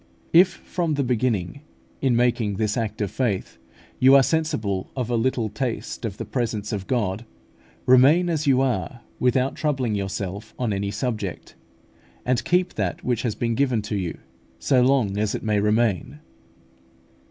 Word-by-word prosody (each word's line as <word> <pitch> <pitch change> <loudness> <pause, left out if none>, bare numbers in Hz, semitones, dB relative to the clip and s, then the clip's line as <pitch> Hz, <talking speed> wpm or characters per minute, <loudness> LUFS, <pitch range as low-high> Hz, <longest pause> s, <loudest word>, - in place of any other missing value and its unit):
If 175 +3 +8
from 170 -4 -2
the 140 - 0
beginning, 120 -2 -1 0.4
in 130 -3 +2
making 120 -4 +1
this 105 +1 0
act 110 -2 -3
of 100 -2 -1
faith, 110 - -2 0.4
you 130 +2 +7
are 135 - +7
sensible 130 - -1
of 125 -2 -2
a - - +2
little 115 -1 0
taste 115 +2 -4
of 105 -3 -4
the - - -5
presence 110 -4 -2
of 95 -2 -4
God, 110 -4 -1 0.6
remain 135 +8 +6
as 155 -3 -1
you 135 -1 +4
are 130 -1 -1 0.2
without 125 +1 +2
troubling 135 -7 -1
yourself 100 +1 -4
on 120 -4 -1
any 100 0 -2
subject, 105 -3 -4 0.7
and 125 -3 +1
keep 180 +5 +1
that 95 -5 -3
which 125 -3 0
has 115 -4 -2
been 115 +1 -1
given 125 -3 +1
you, 95 -5 -2 0.4
so 130 -2 +2
long 125 -6 +2
as 105 -1 0
it - - -5
may 105 -2 +1
remain. 105 - +1
120 Hz, 160 wpm, -24 LUFS, 105-130 Hz, 0.7 s, If